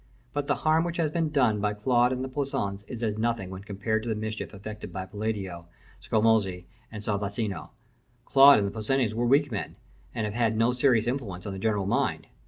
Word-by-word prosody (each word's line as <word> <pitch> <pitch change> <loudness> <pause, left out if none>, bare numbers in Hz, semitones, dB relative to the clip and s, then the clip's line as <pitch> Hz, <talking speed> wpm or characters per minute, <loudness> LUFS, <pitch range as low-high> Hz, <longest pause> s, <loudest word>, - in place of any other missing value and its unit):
But 145 -1 -2
the - - +2
harm 160 +1 +4
which 170 0 -3
has 160 -3 +1
been 165 -1 0
done 125 -8 +2
by 105 0 0
Claude 120 +3 +3
and 130 0 -2
the - - -3
Poussins 130 -8 -3
is 120 -2 -6
as 110 -1 -1
nothing 115 -5 -1
when 95 +1 -8
compared 105 +2 -2
to 115 - -5
the 110 - 0
mischief 110 +1 -4
effected 105 +1 -8
by 95 -1 -5
Palladio, 100 -5 -4 0.3
Scamozzi, 105 -5 +2 0.3
and 105 -2 -7
Sansovino. 100 -2 -2 0.6
Claude 140 +1 +8
and 100 - +1
the - - -4
Poussins 110 +2 0
were 120 +2 0
weak 140 +2 +3
men, 105 - -4 0.4
and 110 -3 -1
have 105 - -3
had 115 -1 +1
no 115 +2 +3
serious 125 -3 +3
influence 115 -8 -3
on 100 - -4
the 95 - -6
general 105 -1 0
mind. 100 - 0
110 Hz, 205 wpm, -27 LUFS, 100-125 Hz, 0.6 s, Claude